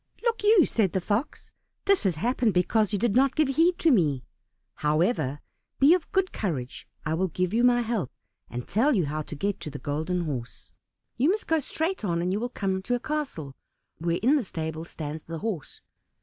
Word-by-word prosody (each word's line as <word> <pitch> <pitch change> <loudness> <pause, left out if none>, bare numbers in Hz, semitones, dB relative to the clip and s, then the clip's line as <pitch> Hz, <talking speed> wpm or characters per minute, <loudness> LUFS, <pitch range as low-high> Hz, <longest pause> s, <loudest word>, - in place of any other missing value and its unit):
"Look 465 -3 0
you," 415 -6 +6
said 205 -6 +1
the 190 - +2
Fox, 205 - -2 0.3
"this 395 -1 +4
has 185 -4 +2
happened 235 +3 +1
because 210 +4 +2
you 205 - +1
did 225 +1 +1
not 265 +1 +4
give 310 -3 +2
heed 330 +6 +3
to 330 - +3
me. 150 - +2 0.5
However, 150 - +1 0.4
be 280 +5 +6
of 360 -3 -1
good 385 -2 +1
courage. 140 - -4 0.2
I 155 - 0
will 185 +4 +1
give 180 +2 -2
you 235 +2 +3
my 245 0 +5
help, 225 - -2 0.4
and 125 0 -6
tell 260 +6 +3
you 180 -6 +2
how 155 +2 -2
to 155 - -7
get 200 +7 -2
to - - -6
the 145 - -7
Golden 160 +6 -2
Horse. 130 -7 -5 0.5
You 270 +6 +3
must 420 +3 0
go 320 0 +2
straight 320 +4 -2
on, 170 -4 0
and 180 +2 0
you 205 - 0
will 245 +2 -2
come 190 -5 -2
to 245 +6 0
a - - -2
castle, 255 - -4 0.4
where 170 +1 0
in 275 +6 +5
the 275 - 0
stable 160 -3 -5
stands 155 -2 -6
the 165 +1 -7
horse. 180 - -5
200 Hz, 205 wpm, -27 LUFS, 160-265 Hz, 0.5 s, you